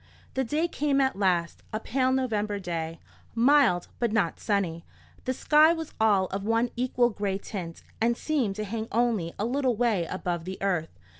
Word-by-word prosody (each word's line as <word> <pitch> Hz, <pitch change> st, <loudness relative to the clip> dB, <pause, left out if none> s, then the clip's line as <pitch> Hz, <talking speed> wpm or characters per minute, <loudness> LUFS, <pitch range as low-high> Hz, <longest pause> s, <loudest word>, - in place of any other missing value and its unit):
The 265 Hz, -, 0 dB
day 300 Hz, +7 st, 0 dB
came 290 Hz, -4 st, 0 dB
at 265 Hz, -1 st, +2 dB
last, 180 Hz, -4 st, 0 dB
a 215 Hz, -, -2 dB
pale 255 Hz, +3 st, 0 dB
November 215 Hz, -6 st, 0 dB
day, 165 Hz, -3 st, -4 dB, 0.4 s
mild 240 Hz, -7 st, +4 dB
but 235 Hz, -3 st, +1 dB
not 200 Hz, -7 st, 0 dB
sunny. 180 Hz, -6 st, -1 dB, 0.4 s
The 255 Hz, -, 0 dB
sky 305 Hz, +4 st, +5 dB
was 325 Hz, -2 st, -6 dB
all 205 Hz, -4 st, +4 dB
of 195 Hz, +1 st, -4 dB
one 225 Hz, +3 st, +1 dB
equal 245 Hz, 0 st, +2 dB
grey 200 Hz, -2 st, -2 dB
tint, 180 Hz, -5 st, -7 dB, 0.2 s
and 235 Hz, +1 st, +2 dB
seemed 260 Hz, -11 st, 0 dB
to 215 Hz, -, -3 dB
hang 220 Hz, +2 st, -4 dB
only 225 Hz, -8 st, 0 dB
a 210 Hz, -, -1 dB
little 255 Hz, 0 st, +1 dB
way 215 Hz, -6 st, +1 dB
above 175 Hz, -2 st, -3 dB
the 190 Hz, +1 st, -5 dB
earth. 180 Hz, -5 st, 0 dB
220 Hz, 175 wpm, -27 LUFS, 190-255 Hz, 0.4 s, sky